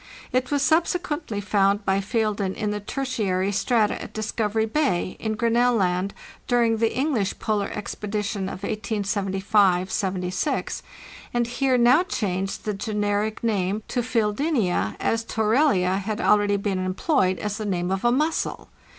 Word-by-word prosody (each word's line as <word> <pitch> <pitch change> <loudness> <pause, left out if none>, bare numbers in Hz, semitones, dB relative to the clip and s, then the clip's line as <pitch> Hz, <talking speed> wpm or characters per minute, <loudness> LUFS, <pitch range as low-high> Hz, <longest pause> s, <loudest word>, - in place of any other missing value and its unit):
It 255 0 0
was 285 -1 +1
subsequently 315 - 0
found 200 0 +1
by 195 +1 +2
Feilden 205 -2 -1
in 210 -2 -2
the 210 - -2
Tertiary 205 -5 -1
strata 220 +1 +1
at - - -8
Discovery 215 0 -1
Bay, 220 -8 0
in 220 -1 -2
Grinnell 235 +2 +2
Land, 185 -1 0 0.3
during 235 -2 +3
the 225 0 +1
English 255 -8 0
Polar 210 -2 -1
Expedition 210 -1 -3
of 190 0 -6
1875 200 -3 +1
76; 185 +6 -1 0.5
and 240 0 +2
Heer 255 +2 +1
now 245 +6 +6
changed 195 - -2
the 210 - -1
generic 210 +1 -1
name 205 -2 0
to 245 - 0
Fezddenza, 220 - 0
as 225 0 0
Torellia 220 -5 +2
had 210 +2 -3
already 205 -2 +3
been 195 -1 -1
employed 185 - +1
as 210 +1 -3
the 215 - -3
name 180 -2 -1
of 190 0 -1
a 240 - +4
mussel. 305 +6 -1
210 Hz, 140 wpm, -24 LUFS, 195-235 Hz, 0.5 s, now